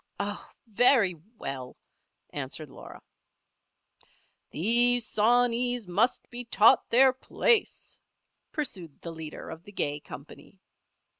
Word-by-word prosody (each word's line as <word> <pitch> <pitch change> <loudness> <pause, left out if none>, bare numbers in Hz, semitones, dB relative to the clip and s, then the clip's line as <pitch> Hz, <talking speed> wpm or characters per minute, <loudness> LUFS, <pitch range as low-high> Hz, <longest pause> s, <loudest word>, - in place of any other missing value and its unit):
"Oh! 205 0 -4 0.2
very 225 -3 +4 0.2
well!" 130 -6 -6 0.5
answered 145 +1 -5
Laura. - - -12 1.5
"These 240 +7 +2
sawneys 245 +2 +2
must 205 +8 0
be 245 0 -4
taught 230 -1 +4
their 260 +2 +6
place," 425 - +1 0.5
pursued 185 - -4
the 170 - -5
leader 160 -1 -8
of 160 0 -9
the 205 - -13
gay 145 -6 -2
company. 150 +7 -13
210 Hz, 100 wpm, -28 LUFS, 160-245 Hz, 1.5 s, their